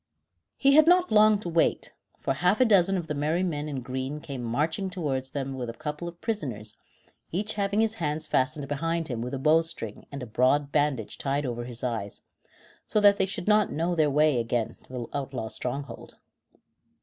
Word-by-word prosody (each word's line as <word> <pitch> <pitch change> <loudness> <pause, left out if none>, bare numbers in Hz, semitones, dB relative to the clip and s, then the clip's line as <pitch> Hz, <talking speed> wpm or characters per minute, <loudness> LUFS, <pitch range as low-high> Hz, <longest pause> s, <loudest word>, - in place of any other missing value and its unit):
He 275 0 +4
had 310 +2 +7
not 360 +1 +5
long 215 0 +6
to 180 - -6
wait, 165 -1 +1 0.3
for 135 - 0
half 180 +8 +2
a 255 - +6
dozen 195 -3 +4
of 175 - -3
the 150 - -3
merry 155 +5 0
men 150 -4 -2
in 135 -3 -4
green 130 +4 -4
came 140 -5 -6
marching 155 - -1
towards 140 -8 -2
them 135 -1 -4
with 125 -3 -4
a - - -5
couple 150 +3 -5
of 170 0 -9
prisoners, 130 - -4 0.6
each 210 +5 -1
having 200 +1 +1
his 220 -1 +1
hands 155 0 -1
fastened 145 +1 0
behind 165 +3 -2
him 120 -3 -3
with 125 +3 -3
a - - -2
bow 155 +4 +4
string 115 -10 -7
and 140 -2 -6
a - - -4
broad 130 +5 +2
bandage 145 -7 0
tied 140 +1 -1
over 120 -1 -3
his 120 0 -7
eyes, 110 -5 -3 0.7
so 215 - +2
that 205 -1 +6
they 190 - +1
should 190 -1 -6
not 210 0 +4
know 165 +3 0
their 155 -3 +3
way 150 -2 +3
again 115 -1 -1
to - - -17
the 125 -2 -4
outlaws' 135 -5 -4
stronghold. 140 +3 -5
150 Hz, 200 wpm, -27 LUFS, 130-180 Hz, 0.7 s, had